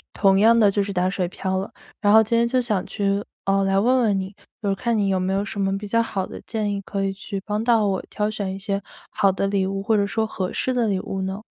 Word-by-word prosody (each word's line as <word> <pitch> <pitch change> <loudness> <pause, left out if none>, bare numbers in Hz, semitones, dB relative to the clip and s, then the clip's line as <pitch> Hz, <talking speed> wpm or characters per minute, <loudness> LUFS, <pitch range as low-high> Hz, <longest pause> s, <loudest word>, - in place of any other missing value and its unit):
同 195 -1 +3
样 230 +3 +5
的 210 -3 +5
就 200 +1 +1
是 200 0 -4
打 180 0 +1
水 185 -2 -1
漂 190 +1 -2
了。 195 - -5 0.3
然 205 -1 +3
后 220 +1 +8
今 220 +2 0
天 235 0 +3
就 255 +2 +1
想 210 -6 0
去 200 0 -1 0.2
呃， 195 0 +2
来 195 0 +2
问 250 +5 +3
问 205 -4 +2
你， 190 +1 -6 0.3
就 205 - -1
是 195 - +2
看 235 +4 -1
你 205 -2 +1
有 190 -1 +1
没 185 +1 -1
有 195 +1 0
什 200 - -4
么 195 0 +1
比 205 +1 -6
较 230 +3 +2
好 195 -4 -2
的 - - -9
建 215 -2 -2
议， 200 - -2
可 195 0 -3
以 195 - 0
去 195 +1 -6
帮 210 0 -2
到 230 -3 +4
我， 195 -2 0
挑 210 0 -1
选 200 -3 -3
一 - - -6
些 200 0 -2 0.3
好 195 -1 +2
的 195 +1 -1
礼 195 -1 +1
物？ 195 0 -3
或 220 +2 +2
者 200 -1 +2
说 220 +2 -1
合 190 -4 -4
适 260 - -1
的 245 -2 +1
礼 195 -3 0
物 190 0 -4
呢？ 190 +2 -4
200 Hz, 305 characters per minute, -23 LUFS, 195-215 Hz, 0.3 s, 后